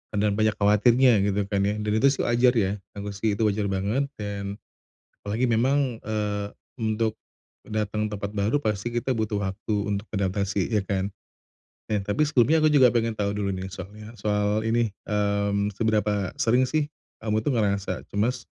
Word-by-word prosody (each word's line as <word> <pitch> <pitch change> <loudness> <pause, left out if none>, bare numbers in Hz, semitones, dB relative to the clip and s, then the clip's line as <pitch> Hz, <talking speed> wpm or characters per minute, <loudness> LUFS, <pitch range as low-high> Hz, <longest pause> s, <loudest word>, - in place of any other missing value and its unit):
ada 105 0 +2
banyak 110 +1 +1
khawatirnya 115 +5 +4 0.2
gitu 100 0 +1
kan 100 - +1
ya 105 - 0
dan 105 0 -2
itu 140 - +5
sih 135 - +1
wajar 120 +1 +3
ya 100 -4 +2 0.2
aku 100 0 -5
sih 105 +1 -1
itu 110 - -1
wajar 105 -1 +1
banget 100 +9 0
dan, 100 -1 -4 0.7
apalagi 110 +5 0
memang, 125 +1 +1
eee, 105 -1 -2 0.3
untuk, 110 0 0 0.5
datang 105 0 -1
ke 105 - -4
tempat 100 0 -4
baru 105 +7 +1
pasti 105 +1 -1
kita 120 +2 -1
butuh 110 -2 -1
waktu 95 +3 -3
untuk 100 +1 -2
adaptasi 100 0 0
ya 105 - +3
kan? 95 0 -2 0.8
Eh, 105 - +2
tapi 105 +10 +1
sebelumnya 150 +3 +4
aku - - +6
juga 135 -4 +7
pengen 115 -1 +1
tahu 100 -1 -1
dulu 100 -1 -1
nih 95 +1 -5
soalnya 105 +4 -9
soal 105 0 +1
ini, 115 -2 +1 0.2
mmm, 100 0 0
seberapa 105 -3 0
sering 125 +3 +3
sih, 155 0 0 0.4
kamu 110 0 +1
tuh 145 - +1
ngerasa 100 -3 0
cemas, 115 +5 0
105 Hz, 170 wpm, -25 LUFS, 100-115 Hz, 0.8 s, juga